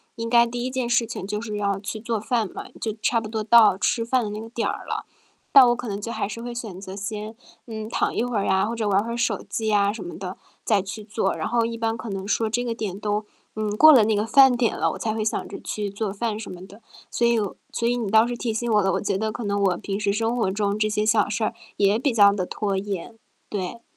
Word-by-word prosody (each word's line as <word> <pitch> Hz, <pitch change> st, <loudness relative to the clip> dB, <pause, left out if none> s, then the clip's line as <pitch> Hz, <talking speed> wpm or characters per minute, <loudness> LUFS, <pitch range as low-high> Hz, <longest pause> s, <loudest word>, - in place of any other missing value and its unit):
应 230 Hz, 0 st, -4 dB
该 235 Hz, 0 st, +6 dB
第 240 Hz, +1 st, -4 dB
1 -, -, -1 dB
件 255 Hz, -2 st, -2 dB
事 240 Hz, -1 st, +3 dB
情 195 Hz, -4 st, -6 dB
就 210 Hz, +1 st, -3 dB
是 210 Hz, -3 st, -4 dB
要 200 Hz, -1 st, 0 dB
去 215 Hz, +1 st, -5 dB
做 230 Hz, 0 st, -2 dB
饭 225 Hz, -1 st, 0 dB
了， -, -, -9 dB
就 220 Hz, -2 st, -2 dB
差 230 Hz, -, +2 dB
不 220 Hz, -, -6 dB
多 220 Hz, 0 st, -3 dB
到 215 Hz, -3 st, +6 dB
吃 230 Hz, +2 st, 0 dB
饭 250 Hz, 0 st, +1 dB
的 210 Hz, -, -3 dB
那 210 Hz, +1 st, -5 dB
个 225 Hz, -, -8 dB
点 235 Hz, -1 st, -2 dB
儿 -, -, -4 dB
了， -, -, -3 dB, 0.5 s
但 265 Hz, -3 st, +9 dB
我 240 Hz, -, +3 dB
可 245 Hz, -1 st, -6 dB
能 200 Hz, 0 st, -3 dB
就 230 Hz, -, -4 dB
还 -, -, -2 dB
是 230 Hz, +3 st, -6 dB
会 240 Hz, 0 st, -5 dB
选 215 Hz, -6 st, -6 dB
择 195 Hz, 0 st, -8 dB
先， 210 Hz, +2 st, -5 dB, 0.3 s
嗯， 220 Hz, -1 st, -6 dB
躺 -, -, 0 dB
一 230 Hz, -, +1 dB
会 245 Hz, -3 st, -2 dB
儿 200 Hz, -, 0 dB
呀， 190 Hz, +1 st, +2 dB
或 230 Hz, -, -3 dB
者 220 Hz, -2 st, -1 dB
玩 200 Hz, +1 st, +3 dB
会 235 Hz, -, -5 dB
儿 235 Hz, -, -3 dB
手 235 Hz, -, 0 dB
机 220 Hz, -1 st, -2 dB
呀， 205 Hz, -1 st, +3 dB
什 225 Hz, -, -7 dB
么 175 Hz, -, -8 dB
的 185 Hz, -1 st, -6 dB, 0.3 s
再 205 Hz, -4 st, +3 dB
去 195 Hz, +3 st, -7 dB
做， 205 Hz, -2 st, -1 dB
然 -, -, -3 dB
后 235 Hz, -1 st, +1 dB
一 230 Hz, 0 st, -4 dB
般 225 Hz, 0 st, -1 dB
可 225 Hz, 0 st, -7 dB
能 195 Hz, 0 st, -4 dB
说 220 Hz, 0 st, +1 dB
这 245 Hz, +2 st, -1 dB
个 230 Hz, -1 st, -2 dB
点 200 Hz, -3 st, -4 dB
都， 210 Hz, 0 st, -1 dB, 0.3 s
嗯， 215 Hz, -1 st, -2 dB
过 310 Hz, 0 st, +9 dB
了 235 Hz, -5 st, +7 dB
那 220 Hz, +1 st, +2 dB
个 210 Hz, +1 st, +1 dB
饭 270 Hz, 0 st, +7 dB
点 240 Hz, -2 st, 0 dB
了， -, -, +1 dB
我 -, -, -6 dB
才 220 Hz, -1 st, -2 dB
会 220 Hz, -1 st, -2 dB
想 215 Hz, -, -2 dB
着 -, -, -7 dB
去 205 Hz, -1 st, -3 dB
做 200 Hz, 0 st, -3 dB
饭 215 Hz, +1 st, -2 dB
什 220 Hz, -, -7 dB
么 180 Hz, +1 st, -9 dB
的， 205 Hz, +4 st, -15 dB, 0.3 s
所 235 Hz, -, 0 dB
以 235 Hz, -1 st, +3 dB
我 205 Hz, -3 st, -3 dB, 0.2 s
所 235 Hz, -, -1 dB
以 245 Hz, -, +2 dB
你 225 Hz, -5 st, -2 dB
倒 220 Hz, +1 st, +6 dB
是 245 Hz, -, -3 dB
提 230 Hz, -1 st, -2 dB
醒 235 Hz, +1 st, -2 dB
我 210 Hz, -2 st, +4 dB
了， 190 Hz, 0 st, +1 dB
我 -, -, +1 dB
觉 200 Hz, -2 st, 0 dB
得 220 Hz, +1 st, -1 dB
可 230 Hz, 0 st, -6 dB
能 200 Hz, 0 st, 0 dB
我 180 Hz, -3 st, +2 dB
平 195 Hz, 0 st, -4 dB
时 205 Hz, -1 st, 0 dB
生 225 Hz, +3 st, 0 dB
活 210 Hz, -6 st, +1 dB
中 205 Hz, 0 st, -1 dB
这 215 Hz, 0 st, +1 dB
些 210 Hz, 0 st, 0 dB
小 215 Hz, -2 st, +3 dB
事 215 Hz, +1 st, -1 dB
儿 -, -, -2 dB, 0.2 s
也 200 Hz, +1 st, +3 dB
比 265 Hz, -2 st, +1 dB
较 200 Hz, -2 st, +7 dB
地 185 Hz, -3 st, -2 dB
拖 200 Hz, 0 st, -2 dB
延， 200 Hz, +2 st, -5 dB, 0.3 s
对。 205 Hz, +3 st, -4 dB
215 Hz, 305 characters per minute, -24 LUFS, 200-230 Hz, 0.5 s, 但